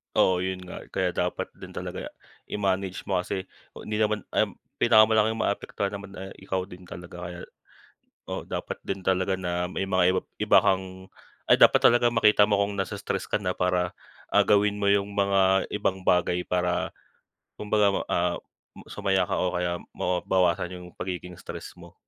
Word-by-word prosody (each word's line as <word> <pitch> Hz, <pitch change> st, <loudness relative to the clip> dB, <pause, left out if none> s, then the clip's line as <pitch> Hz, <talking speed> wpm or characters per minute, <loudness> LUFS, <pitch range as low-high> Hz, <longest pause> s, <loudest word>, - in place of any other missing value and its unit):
Oo, 90 Hz, -1 st, +4 dB
yun 95 Hz, 0 st, -3 dB
nga, 90 Hz, -, -9 dB
kaya 90 Hz, -1 st, -1 dB
dapat 90 Hz, +1 st, -2 dB
din -, -, -10 dB
talaga -, -, -5 dB, 0.4 s
i-manage 95 Hz, -2 st, -1 dB
mo 95 Hz, -2 st, 0 dB
kasi 95 Hz, +1 st, -3 dB, 0.3 s
hindi 105 Hz, 0 st, -4 dB
naman, 105 Hz, -2 st, +1 dB
um, -, -, +1 dB, 0.2 s
pinakamalaking 110 Hz, 0 st, +5 dB
maapektuhan 100 Hz, -2 st, -2 dB
naman 100 Hz, -1 st, -8 dB
eh 95 Hz, +1 st, -7 dB
ikaw 95 Hz, -1 st, -2 dB
din 90 Hz, -1 st, -12 dB
talaga. 90 Hz, 0 st, -9 dB
Kaya, 85 Hz, 0 st, -8 dB, 0.9 s
oo, -, -, -4 dB
dapat -, -, -4 dB
din 95 Hz, 0 st, -3 dB
talaga 95 Hz, +1 st, +1 dB
na 90 Hz, -1 st, -2 dB
may 95 Hz, +2 st, -3 dB
mga 95 Hz, -1 st, +3 dB
ib -, -, +2 dB, 0.3 s
iba -, -, +7 dB
kang 95 Hz, -1 st, -1 dB, 0.4 s
ay, -, -, +6 dB
dapat -, -, +8 dB
talagang 120 Hz, 0 st, +5 dB
makita 105 Hz, -2 st, +5 dB
mo 105 Hz, -1 st, +3 dB
kung 100 Hz, 0 st, 0 dB
nai-stress 95 Hz, -1 st, -3 dB
ka -, -, +2 dB
na 90 Hz, -3 st, -2 dB
para, 90 Hz, -1 st, 0 dB, 0.4 s
ah, -, -, +7 dB
gawin 105 Hz, 0 st, +3 dB
mo 100 Hz, -, +4 dB
yung 100 Hz, 0 st, +1 dB
mga 95 Hz, -1 st, +3 dB
ibang 95 Hz, -2 st, -1 dB
bagay 90 Hz, -1 st, +2 dB
para 90 Hz, 0 st, -1 dB, 0.7 s
kumbaga, 105 Hz, -1 st, +3 dB, 0.2 s
ah, 85 Hz, 0 st, 0 dB, 0.5 s
sumaya 95 Hz, -3 st, 0 dB
ka -, -, -1 dB
o 90 Hz, -, 0 dB
kaya 90 Hz, -1 st, -1 dB, 0.2 s
mawa 90 Hz, -1 st, -1 dB
mabawasan 90 Hz, -1 st, +1 dB
yung 90 Hz, -1 st, -8 dB
pagiging 90 Hz, -1 st, -5 dB
stress -, -, -9 dB
mo. -, -, -14 dB
95 Hz, 165 wpm, -26 LUFS, 90-100 Hz, 0.9 s, dapat